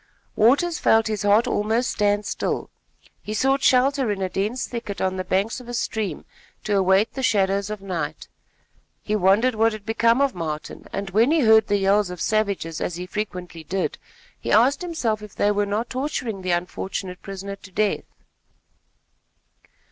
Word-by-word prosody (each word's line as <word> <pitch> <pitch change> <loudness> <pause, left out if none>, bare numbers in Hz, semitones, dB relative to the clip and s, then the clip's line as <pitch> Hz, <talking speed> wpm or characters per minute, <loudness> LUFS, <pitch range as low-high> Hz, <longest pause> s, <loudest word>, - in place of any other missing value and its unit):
Waters 290 +9 +3
felt 225 0 +4
his 215 -2 -2
heart 205 +3 +4
almost 225 +1 0
stand 205 0 +1
still. - - -3 0.5
He 215 - -5
sought 270 +4 +2
shelter 265 -1 +3
in 205 -2 -1
a 190 -1 -1
dense 210 +7 -2
thicket 230 -4 -6
on 190 0 0
the 185 - -3
banks 195 +6 0
of 245 -1 -12
a 240 - -4
stream 215 -7 -3 0.4
to 210 - 0
await 190 +2 +3
the 265 - -4
shadows 200 -4 +1
of 210 -2 -6
night. 165 -6 -4 0.8
He 215 - -1
wondered 210 +6 +3
what 225 +1 +2
had 215 -2 -9
become 230 +2 +2
of 280 -3 +2
Martin, 155 -4 -5
and 195 0 -4
when 225 +6 +4
he 320 0 +3
heard 220 -2 +5
the 205 - +2
yells 200 0 +2
of 180 -1 -7
savages 200 -6 -1
as 175 - -2
he 180 +1 -5
frequently 180 -4 -5
did, 185 +5 -2 0.4
he - - -4
asked 250 - +4
himself 255 -12 -2
if 210 -2 -11
they 205 - +2
were 205 0 0
not 215 +4 -2
torturing 255 -6 -3
the 185 - -4
unfortunate 180 +1 -3
prisoner 195 0 -6
to 200 - -14
death. 205 +2 0
210 Hz, 175 wpm, -23 LUFS, 190-230 Hz, 0.8 s, heard